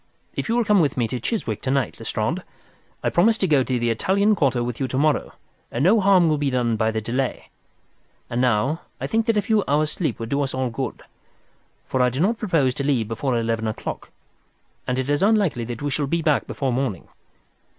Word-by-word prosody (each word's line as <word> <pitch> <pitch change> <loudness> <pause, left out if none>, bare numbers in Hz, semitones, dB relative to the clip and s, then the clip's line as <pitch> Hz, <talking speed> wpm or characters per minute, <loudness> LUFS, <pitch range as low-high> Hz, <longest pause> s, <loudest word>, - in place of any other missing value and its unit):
If - - -3
you 230 - +2
will 240 -1 +2
come 210 -1 +4
with 145 -6 +1
me 120 -2 +1
to 125 - -3
Chiswick 115 - -2
to 130 - -3
night, 135 -4 0
Lestrade, - - -2 0.6
I'll - - +1
promise 220 +6 +4
to 195 - 0
go 150 -5 +4
to 130 -1 -1
the 120 -1 +1
Italian 200 - +2
Quarter 135 - +1
with 120 -1 -4
you 135 - 0
to 130 - -3
morrow, 150 -1 +1 0.4
and 120 - -1
no 205 +7 +5
harm 190 -3 +5
will 155 -2 +1
be 145 -1 +1
done 120 -3 +1
by 110 0 +1
the 110 0 -2
delay. 125 +4 -2 0.8
And 120 +1 -1
now 125 +6 +1 0.2
I - - -3
think 225 +1 0
that 225 -2 +2
a 205 - +2
few 220 -4 +2
hours' 150 +2 +2
sleep 170 - -2
would 115 0 -6
do 140 +2 0
us 135 -2 -2
all 130 -2 -1
good, 130 +3 -4 0.8
for 130 - -1
I 125 - +4
do 130 +2 -5
not 220 +7 +1
propose 160 - +1
to 140 - -4
leave 130 -6 +1
before 120 +3 -1
eleven 115 -1 -1
o'clock, 110 - -5 0.8
and 125 - 0
it 130 0 -1
is 145 +1 +1
unlikely 195 - +2
that 120 +2 -6
we 145 - -1
shall 145 0 -1
be 165 +3 -1
back 150 -3 +2
before 135 -3 -2
morning. 120 -8 -2
135 Hz, 225 wpm, -23 LUFS, 120-170 Hz, 0.8 s, no